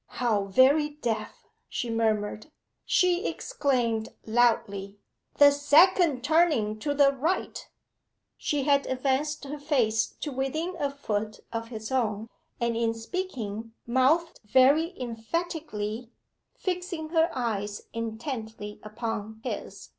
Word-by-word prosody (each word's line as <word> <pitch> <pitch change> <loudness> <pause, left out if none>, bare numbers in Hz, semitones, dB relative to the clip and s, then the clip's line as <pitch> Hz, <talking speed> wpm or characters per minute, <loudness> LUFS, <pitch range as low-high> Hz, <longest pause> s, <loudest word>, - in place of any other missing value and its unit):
'How 220 -5 0
very 265 +9 +4
deaf!' 235 -7 -3 0.2
she 240 - -3
murmured. 215 -1 0 0.4
She 360 +2 +2
exclaimed 245 - 0 0.2
loudly 205 -4 +1 0.4
'The 285 0 +8
second 290 0 +4
turning 290 -9 +2
to 285 +5 -1
the 280 -1 +6
right.' 310 +7 -2 0.7
She 290 -2 -1
had 280 0 +3
advanced 275 +3 -1
her 290 +2 -6
face 235 -7 +2
to 295 - -3
within 310 +7 -2
a 285 - +1
foot 215 -6 -3
of 230 0 -3
his 220 -1 -7
own, 225 -4 0 0.3
and 235 -1 0
in 230 0 0
speaking 225 - -5
mouthed 265 +8 +2
very 275 - +4
emphatically, 235 -2 -4 0.5
fixing 360 -3 -3
her 325 0 +3
eyes 210 -5 -2
intently 225 -2 -5
upon 220 0 -5
his. 200 -4 -6
250 Hz, 115 wpm, -27 LUFS, 220-295 Hz, 0.7 s, The